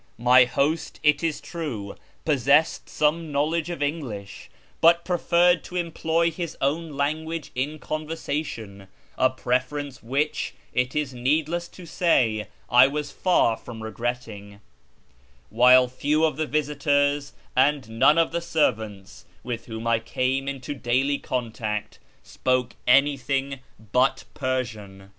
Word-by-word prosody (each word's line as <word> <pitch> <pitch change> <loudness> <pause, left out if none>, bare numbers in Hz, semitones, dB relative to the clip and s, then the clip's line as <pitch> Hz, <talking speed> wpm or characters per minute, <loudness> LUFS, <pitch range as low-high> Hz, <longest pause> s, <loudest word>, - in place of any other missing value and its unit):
My 125 +1 +6
host, 145 +6 -1
it 150 +1 +3
is 155 -3 -1
true, 145 - -5 0.3
possessed 145 +1 +2
some 155 +1 0
knowledge 155 +4 0
ot" 170 -4 -3
English, 120 -10 -5 0.3
but 170 +1 +5
preferred 175 -1 +3
to 180 - -9
employ 170 -1 0
his 170 0 -5
own 155 +3 -1
language 155 +2 -2
in 145 +5 -2
con 155 0 -5
versation; 130 -11 -5 0.3
a 130 - +3
preference 130 +2 -2
which, 140 +6 -2 0.2
it 125 +2 0
is 150 -3 -1
needless 155 +7 0
to 180 - -13
say, 115 -12 +1 0.2
I 125 +2 +7
was 145 +1 -4
far 175 -11 +2
from 110 -1 -10
regretting; 110 -3 -5 0.9
while 125 +1 +6
few 150 +5 +1
of 155 - 0
the 155 +1 -2
visitors, 145 -1 0 0.2
and 135 -1 +2
none 150 - +6
of 165 - +3
the 170 +1 -2
servants, 110 - -2 0.2
with 115 -1 -5
whom 110 0 -6
I 115 -1 +2
came 130 +4 -1
into 140 0 -4
daily 135 +2 0
contact, 110 -4 -4 0.2
spoke 130 -2 -1
anything 135 0 +2 0.3
but 125 - +2
Persian. 110 -8 -4
140 Hz, 130 wpm, -25 LUFS, 120-155 Hz, 0.9 s, I